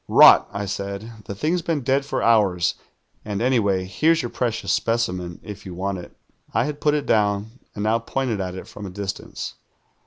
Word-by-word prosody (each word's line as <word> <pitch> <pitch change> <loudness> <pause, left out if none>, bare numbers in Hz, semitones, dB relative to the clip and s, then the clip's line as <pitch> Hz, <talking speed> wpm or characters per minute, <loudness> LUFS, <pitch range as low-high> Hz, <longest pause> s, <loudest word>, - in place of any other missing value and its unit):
"'Rot,' - - +8
I 100 +1 -3
said. 100 +2 -4
'The 100 - -5
thing's 160 - 0
been 160 -3 -1
dead 135 +2 +1
for - - -2
hours, 100 -7 +3 0.5
and 105 -2 -3
anyway, 105 -7 +2
here's 160 - +2
your 120 - -4
])reci()us 120 -2 -2
specimen 90 -7 0
if 105 -1 -8
you 90 -3 -8
want 95 +1 -2
it.' 85 - -12 0.4
"I - - +3
had 150 -1 -5
])ul 150 -1 +4
it 145 - -1
down, 105 +3 +1 0.2
and 105 - -3
now 110 +2 +2
pointed 115 -3 -2
at 90 -1 -4
it 95 - -8
from 105 -1 -8
a - - -6
distance. 100 +1 -5
105 Hz, 190 wpm, -23 LUFS, 100-125 Hz, 0.5 s, Rot